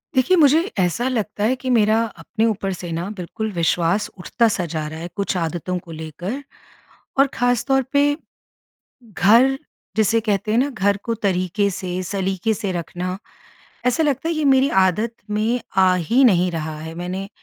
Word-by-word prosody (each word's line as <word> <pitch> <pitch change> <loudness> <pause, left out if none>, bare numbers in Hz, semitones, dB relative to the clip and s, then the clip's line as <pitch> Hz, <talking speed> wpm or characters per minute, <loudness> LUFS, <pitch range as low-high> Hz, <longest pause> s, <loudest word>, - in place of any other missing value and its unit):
देखिए, 265 +9 +4
मुझे 300 -1 +6 0.2
ऐसा 185 +7 +1
लगता 210 -4 -2
है 240 +5 +2
कि 260 0 -5
मेरा 220 -2 +4 0.2
अपने 225 -1 -1
ऊपर 205 -3 -1
से 175 -1 -7
ना, 170 +4 -3
बिल्कुल 215 +5 -4
विश्वास 170 +3 +1
उठता 230 +6 +1
सा 205 -5 -1
जा 155 -2 -3
रहा 160 +1 -7
है, 170 - -5
कुछ 200 -1 -1
आदतों 175 +2 -2
को 175 -1 -13
लेकर। 165 - -6 0.8
और 275 - +6
ख़ास 245 -1 +1
तौर 270 -1 +2
पे, 290 0 +3 0.9
घर 230 +6 +4 0.4
जिसे 220 +1 +3
कहते 210 -1 -1
हैं 230 - +3
ना, 270 +3 +2
घर 200 -5 +1
को 230 - -1
तरीके 200 -1 0
से, 185 -1 -4
सलीके 195 +2 -1
से 200 -2 -3
रखना, 180 +2 -4 0.7
ऐसा 250 +6 +2
लगता 290 +2 0
है 335 - -1
ये 310 - 0
मेरी 270 0 +4 0.2
आदत 215 +6 -1 0.2
में 220 +4 0 0.2
आ 185 -1 +5
ही 230 - +2
नहीं 180 -5 +4
रहा 160 -2 -4
है। 160 +1 -7
मैंने 185 +3 -4
205 Hz, 175 wpm, -21 LUFS, 180-240 Hz, 0.9 s, मुझे